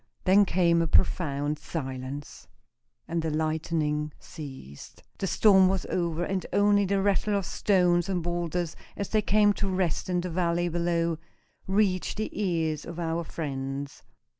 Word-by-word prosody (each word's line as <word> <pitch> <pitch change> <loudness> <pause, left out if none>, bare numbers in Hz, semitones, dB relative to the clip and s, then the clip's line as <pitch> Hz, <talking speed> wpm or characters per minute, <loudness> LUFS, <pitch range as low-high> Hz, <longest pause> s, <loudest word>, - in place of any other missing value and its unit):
Then 200 +2 +5
came 170 -2 +3
a 165 - +1
profound 145 -2 +1
silence, 135 -2 -6 0.6
and 165 0 -1
the 160 - -2
lightning 155 -1 -1
ceased. 130 - -10 0.2
The 195 - -1
storm 190 -1 +5
was 190 -2 -1
over, 170 -1 -1
and 190 +1 -2
only 205 0 +4
the 195 0 +1
rattle 205 +1 +1
of 195 - -2
stones 180 -2 +2
and 180 -3 -1
boulders, 175 -1 -2 0.2
as 200 - -3
they 215 - +2
came 210 0 +4
to 200 -1 -2
rest 185 -1 -1
in 180 -1 +1
the 180 0 -4
valley 175 0 0
below, 170 -1 0 0.5
reached 190 -1 +1
the 215 - -2
ears 165 -6 -1
of 170 0 -8
our 165 0 -1
friends. 140 -3 -5
170 Hz, 150 wpm, -27 LUFS, 155-190 Hz, 0.6 s, Then